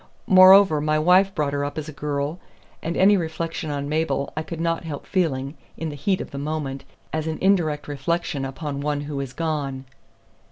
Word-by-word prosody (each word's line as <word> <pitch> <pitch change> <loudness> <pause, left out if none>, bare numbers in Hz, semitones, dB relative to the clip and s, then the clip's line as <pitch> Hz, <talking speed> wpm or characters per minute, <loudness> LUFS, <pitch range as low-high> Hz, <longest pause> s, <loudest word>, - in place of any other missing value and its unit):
Moreover, 185 -4 +7
my 155 +1 +1
wife 185 +5 +4
brought 145 -2 0
her 145 0 -1
up 145 +1 -4
as 155 0 -4
a - - -6
girl, 145 +3 -3 0.4
and 170 - -3
any 200 +2 +6
reflection 165 -2 -3
on 140 -1 -3
Mabel 155 -2 -1
I 155 - -1
could 160 +1 -7
not 165 0 -1
help 150 -4 -6
feeling, 145 -7 -1 0.2
in 160 - -3
the 145 - -6
heat 185 +7 0
of - - -8
the 140 - -5
moment, 140 -2 -4 0.3
as 155 0 -2
an 160 - -2
indirect 165 -7 +1
reflection 145 +1 -2
upon 140 +1 -4
one 145 0 -1
who 145 -1 -5
is 135 -2 -4
gone." 140 -4 -3
155 Hz, 195 wpm, -23 LUFS, 145-165 Hz, 0.4 s, Moreover